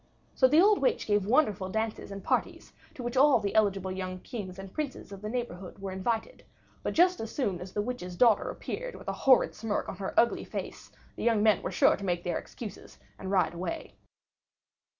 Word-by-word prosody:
So 260 - +5
the 300 +5 +5
old 410 +3 +5
witch - - +1
gave 205 -2 +1
wonderful 215 -7 +2
dances 220 +2 -3
and 200 -1 -7
parties, - - -1 0.2
to 250 - -7
which 240 +1 -3
all 270 -1 +6
the 200 -2 -2
eligible 195 -3 +2
young 185 0 -4
kings 195 -7 -7
and 195 -1 -9
princes 290 -8 -5
of 195 -1 -9
the 210 - -4
neighborhood 210 -7 -5
were 195 -1 -5
invited; 225 - -2 0.4
but - - -3
just 360 +2 +4
as 225 0 -5
soon 195 -11 -1
as 180 0 -8
the 205 - -1
witch's 210 -7 -5
daughter 225 +2 +4
appeared - - -5
with - - -12
a - - -1
horrid 260 -2 +4
smirk 215 -1 -2
on - - -6
her 195 0 0
ugly 235 - +2
face, - - -7 0.2
the - - -6
young 225 -3 +3
men 215 -3 +4
were - - -3
sure - - +4
to - - -9
make 175 -2 -1
their 175 -2 -1
excuses 220 -4 -10 0.2
and 190 - -5
ride 190 -3 +2
away. 185 - -5
210 Hz, 210 wpm, -29 LUFS, 190-250 Hz, 0.4 s, all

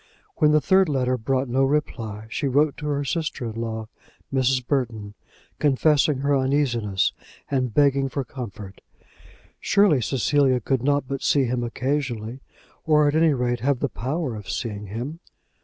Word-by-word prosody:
When 150 -1 +4
the 150 - +5
third 190 +2 +3
letter 130 -3 +1
brought 130 +3 -1
no 130 +3 +1
reply 115 -7 -2
she 140 - -1
wrote 145 +2 +2
to 150 - -5
her 145 -1 -1
sister 155 -4 -2
in 115 - -4
law, 110 -1 -4 0.5
Mrs. 130 -1 +1
Burton, 115 -7 -2 0.5
confessing 145 0 +3
her 140 0 +2
uneasiness, 130 -8 +1 0.4
and 130 -3 0
begging 140 +1 +3
for 140 +1 -3
comfort. 105 -7 -8 0.8
Surely 200 -10 +3
Cecilia 135 +1 +2
could 130 +2 -1
not 145 0 +1
but 135 0 -4
see 140 - +3
him 120 0 -1
occasionally, 125 -2 -2 0.4
or 150 -1 +4
at 145 - +1
any 160 -2 +3
rate 120 -1 -1
have 130 +2 0
the 140 - -1
power 130 +3 -3
of 105 -3 -9
seeing 105 -3 -4
him. 125 - -5
135 Hz, 155 wpm, -24 LUFS, 120-145 Hz, 0.8 s, the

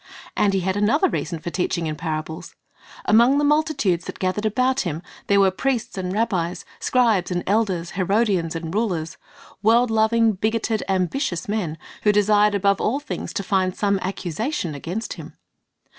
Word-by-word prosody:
And 200 -1 +2
He 190 - +1
had 190 +1 -1
another 230 - +3
reason 175 - -3
for 170 +2 -6
teaching 175 -2 -1
in 155 -1 -2
parables. 160 +1 -5 0.5
Among 235 +6 +5
the 290 - +2
multitudes 290 - +1
that - - -7
gathered 190 +3 -1
about 255 +4 +1
Him, 170 - -3 0.2
there 200 0 +4
were 195 -1 +5
priests 250 +4 -2
and 185 -1 -3
rabbis, 185 -5 -1
scribes 230 -7 +2
and 175 -1 -2
elders, 190 -5 0
Herodians 190 -3 +1
and 165 0 -5
rulers, 180 -7 -1 0.4
world 230 +3 +4
loving, 225 +1 +3
bigoted, 220 +2 -1
ambitious 185 - -1
men, 195 -7 -2 0.2
who 210 - +4
desired 210 0 +3
above 200 0 +2
all 255 +6 +1
things 295 - -5
to 200 - -2
find 185 -1 0
some 200 -2 +1
accusation 185 - -3
against 175 +10 -4
Him. - - -11
200 Hz, 160 wpm, -22 LUFS, 180-225 Hz, 0.5 s, Among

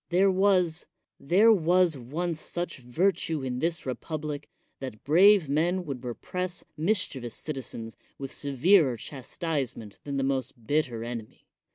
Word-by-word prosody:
Thei 180 +3 +4
was 185 -3 +2 0.2
— - - -26
tiiere 205 +10 +6
was 175 -1 +3
once 155 +6 -3
such 175 -4 -3
virtue 160 +3 0
in 125 -1 -3
this 165 +3 0
republi 150 +2 -4 0.3
that 130 -6 -7
brave 185 +3 +6
men 175 +6 +1
would 135 -4 -5
repress 180 +9 -4
mischievous 155 - -1
cit 155 -3 -5
zens 115 -3 -6 0.2
with 135 -1 -6
severer 140 0 +3
chastisement 135 -4 -4
than 140 -1 -3
the 135 - 0
most 130 -3 -2
bii 150 +4 +2
ter 115 -3 -6
enemy. 115 -2 -7
150 Hz, 145 wpm, -28 LUFS, 130-175 Hz, 0.3 s, tiiere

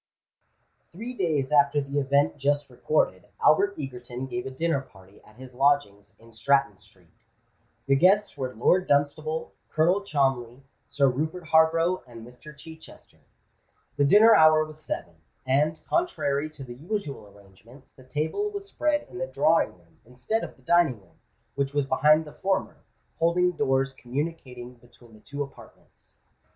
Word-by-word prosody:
Three 230 +8 -7
days 155 - -1
after 145 0 +4
the 140 0 -2
event 140 +1 +1
just 145 0 0
recorded, 110 -7 -1
Albert 200 +6 +3
Egerton 125 -2 -6
gave 180 +6 -5
a - - -4
dinner 140 +2 -1
party 95 -6 -19
at 105 - -20
his 130 +1 -12
lodgings 135 -7 0
in 115 0 -19
Stratton 135 +4 +1
Street. - - -22 0.7
The 135 - +3
guests 195 +7 +3
were 130 -3 -4
Lord 180 +11 +2
Dunstable, 155 +3 0 0.2
Colonel 175 +6 +2
Cholmondeley, 135 -7 -1 0.2
Sir 140 +1 +2
Rupert 155 +6 -3
Harborough, 165 +3 +3
and 115 -2 -11
Mr. 125 +5 -14
Chichester. 160 +1 -14 0.8
The 145 - +1
dinner 210 +10 +7
hour 155 -3 +6
was 155 0 -13
seven; 85 - -6 0.3
and, 150 +4 +1
contrary 155 - -1
to 155 -3 -11
the 120 -2 -9
usual 145 - -5
arrangements, 100 +6 -19
the 130 - -17
table 155 - -2
was 405 -1 -7
spread 305 -6 -1
in 185 - -10
the 175 - -2
drawing 150 - +1
room, 85 -1 -28
instead 125 - -3
of - - -8
the 130 - -26
dining 165 -6 +2
room, 85 -5 -27 0.3
which 140 0 -3
was 145 -1 +1
behind 150 +4 +3
the 150 - -12
former, 190 0 -2 0.4
folding 180 +2 +2
doors 135 -4 0
communicating 130 -2 -6
between 120 -1 -21
the 110 - -16
two 140 +6 -5
apartments. 140 - -17
145 Hz, 155 wpm, -26 LUFS, 130-160 Hz, 0.8 s, dinner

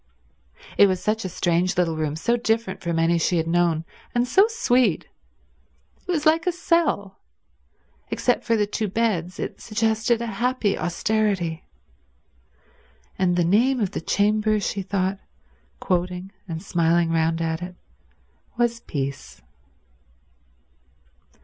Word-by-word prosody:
It 200 - +8
was 185 -1 0
such 220 +3 -1
a - - -2
strange 175 +1 0
little 170 -3 +1
room, 155 -1 -2
so 235 +9 +1
different 225 -4 -1
from 170 -1 -2
any 165 +1 +2
she 175 +2 +1
had 165 - 0
known, 165 -1 +1 0.3
and 240 +1 +2
so 390 - +5
sweet. 250 - +1 1.0
It - - -1
was 315 -3 -1
like 325 +2 +3
a - - +4
cell. 335 - 0 0.9
Except 245 - 0
for 230 - +1
the 210 -1 +2
two 210 +1 -2
beds, 190 -4 -1
it - - -5
suggested 225 +1 +1
a 235 - -3 0.2
happy 250 -5 +1
austerity. 185 -2 -1 1.5
"And 180 -2 +2
the 175 -1 +2
name 240 +9 +3
of 205 -5 0
the - - -4
chamber," 215 +4 +1
she 200 0 -2
thought, 190 0 -1 0.6
quoting 180 +1 -2 0.2
and 165 0 -5
smiling 170 -2 +2
round 165 0 +1
at 165 0 -2
it, 180 0 -7 0.8
"was 240 -1 +1
Peace." 140 - -5
195 Hz, 135 wpm, -23 LUFS, 170-230 Hz, 1.5 s, It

